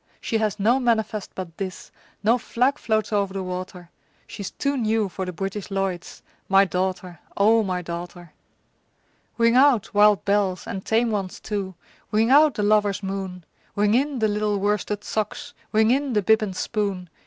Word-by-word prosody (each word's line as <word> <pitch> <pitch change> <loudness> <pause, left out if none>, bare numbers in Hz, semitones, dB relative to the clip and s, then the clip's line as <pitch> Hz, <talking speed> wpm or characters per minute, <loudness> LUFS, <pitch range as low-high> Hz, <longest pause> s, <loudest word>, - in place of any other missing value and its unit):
She 225 - -1
has 215 -1 -1
no 235 +6 +3
manifest 220 -4 -1
but 175 -3 -7
this, 190 -3 -6 0.3
No 230 +4 +3
flag 255 +5 0
floats 220 -1 -1
o'er 200 -1 +2
the 190 0 -5
water, 180 -1 -7 0.3
She's 200 - -7
too 280 0 -2
new 220 -4 +1
for 190 +1 -5
the - - -3
British 195 +4 -5
Lloyds 195 -3 -3 0.3
My 195 +1 +6
daughter, 185 -2 -3 0.2
O 220 +3 +5
my 185 -3 -2
daughter! 175 0 -8 1.0
Ring 230 0 +3
out, 260 -5 +4
wild 210 -1 +4
bells, 200 -3 +1
and 190 -1 -5
tame 230 +1 +1
ones 195 -3 -3
too! 195 -3 -4 0.4
Ring 220 +3 +2
out 295 -2 +6
the 210 - -1
lover's 205 -1 +2
moon! 190 -2 -5 0.3
Ring 205 +1 +2
in 275 +3 +1
the 220 -2 +2
little 210 0 0
worsted 205 +1 -1
socks! 215 -1 -4 0.2
Ring 220 +1 +3
in 275 0 +1
the 210 -2 +1
bib 220 +2 +4
and 195 -3 -3
spoon! 200 -4 -2
205 Hz, 170 wpm, -23 LUFS, 190-220 Hz, 1.0 s, My